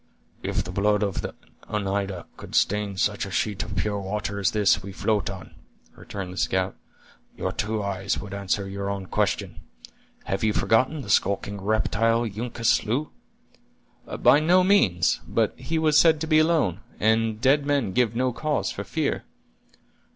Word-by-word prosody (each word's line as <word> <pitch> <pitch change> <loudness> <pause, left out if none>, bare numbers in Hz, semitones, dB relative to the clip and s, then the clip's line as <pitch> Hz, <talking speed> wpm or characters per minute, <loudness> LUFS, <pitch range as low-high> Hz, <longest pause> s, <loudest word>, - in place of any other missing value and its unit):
"If - - -1
the 90 - -7
blood 105 +2 +2
of 100 -3 -2
an - - -5 0.4
Oneida 100 -3 -2
could - - -9
stain 105 -1 +1
such 105 +2 0
a 100 - -5
sheet 100 +1 -1
of - - -6
pure 100 +2 -1
water 100 +1 -3
as 95 - +2
this 105 -2 +2
we 100 - -8
float 105 0 0
on," 95 -5 -9 0.4
returned 95 -2 -7
the - - -11
scout, 95 0 0 0.6
"your - - -2
two 105 0 -2
eyes 100 0 -2
would 100 -2 -7
answer 100 0 -2
your 100 0 -4
own 100 -1 -3
question. - - -1 0.6
Have 95 +2 -3
you 110 -1 +2
forgotten 130 +9 +2
the 100 - -10
skulking 100 +1 +1
reptile 110 +2 +1
Uncas 115 +1 -4
slew?" 130 +8 +1 1.1
"By 145 - +7
no 180 +4 +4
means. 140 - +3
But - - +1
he 165 - -3
was 155 -2 +4
said 160 -2 +5
to - - 0
be 155 -1 +5
alone, 155 - +2 0.2
and 110 0 +2
dead 140 +4 +3
men 140 -9 +1
give 115 +2 +1
no 125 +1 +1
cause 155 +3 -1
for - - -5
fear." - - -2
105 Hz, 165 wpm, -25 LUFS, 100-120 Hz, 1.1 s, By